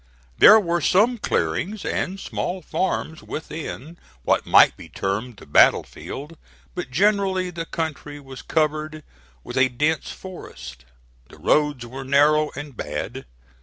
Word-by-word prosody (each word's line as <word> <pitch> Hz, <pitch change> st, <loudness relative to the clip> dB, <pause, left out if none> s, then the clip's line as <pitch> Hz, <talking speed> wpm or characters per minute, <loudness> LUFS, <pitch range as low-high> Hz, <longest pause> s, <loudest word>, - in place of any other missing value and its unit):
There 215 Hz, +1 st, +9 dB
were 175 Hz, -3 st, -1 dB
some 225 Hz, +6 st, +3 dB
clearings 170 Hz, -, -1 dB
and 190 Hz, +2 st, -2 dB
small 185 Hz, -1 st, -4 dB
farms 160 Hz, -4 st, -2 dB
within 155 Hz, 0 st, -7 dB, 0.2 s
what -, -, +1 dB
might -, -, +6 dB
be -, -, -12 dB
termed 105 Hz, +4 st, -3 dB
the -, -, -13 dB
battle -, -, +5 dB
field; 150 Hz, +4 st, -9 dB, 0.3 s
but 180 Hz, -8 st, -5 dB
generally 190 Hz, +3 st, +1 dB
the 165 Hz, -1 st, -6 dB
country 150 Hz, -2 st, -4 dB
was 135 Hz, -2 st, -10 dB
covered 155 Hz, 0 st, -1 dB, 0.4 s
with 120 Hz, -, -7 dB
a 130 Hz, 0 st, +4 dB
dense 150 Hz, +6 st, -1 dB
forest. 65 Hz, -, -10 dB, 0.4 s
The -, -, -15 dB
roads 150 Hz, -5 st, +1 dB
were 130 Hz, +3 st, -8 dB
narrow 150 Hz, +3 st, +3 dB
and 145 Hz, -2 st, -8 dB
bad. 75 Hz, -, -5 dB
155 Hz, 135 wpm, -23 LUFS, 130-180 Hz, 0.4 s, There